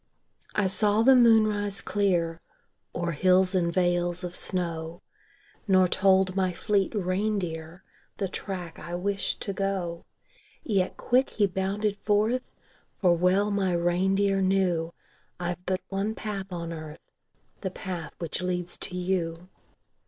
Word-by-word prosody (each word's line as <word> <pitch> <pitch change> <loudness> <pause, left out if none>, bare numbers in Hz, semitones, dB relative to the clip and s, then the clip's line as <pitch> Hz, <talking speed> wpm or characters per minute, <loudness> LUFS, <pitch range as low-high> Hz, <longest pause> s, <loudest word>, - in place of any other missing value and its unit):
I 210 - +2
saw 210 +3 +3
the 265 +2 +7
moon 230 -3 +6
rise 205 -2 0
clear 175 -5 0 0.5
O'er 170 0 -1
hills 185 +4 +3
and 175 -2 +1
vales 175 0 +1
of 180 0 -4
snow 170 -2 -1 0.6
Nor 185 -2 +5
told 190 0 +3
my 185 -2 +1
fleet 195 +2 0
reindeer 185 -3 -2 0.3
The 195 - -1
track 180 -3 -6
I 170 +3 -6
wished 195 +2 -2
to 200 - -3
go. 190 -4 -2 0.6
Yet 195 -5 0
quick 255 +2 +2
he 210 - +2
bounded 200 +2 -1
forth; 215 +5 +1 0.6
For 180 -3 +4
well 185 +4 +2
my 195 -3 +1
reindeer 190 +3 +2
knew 185 -4 +1 0.5
I've 175 0 -3
but 185 0 0
one 200 +3 -2
path 200 -3 -5
on 170 -1 -4
earth 155 -1 -10 0.5
The 190 - -3
path 180 -4 -6
which 170 0 -2
leads 180 -1 -3
to 180 - -5
you. 180 -1 -2
185 Hz, 135 wpm, -27 LUFS, 175-200 Hz, 0.6 s, the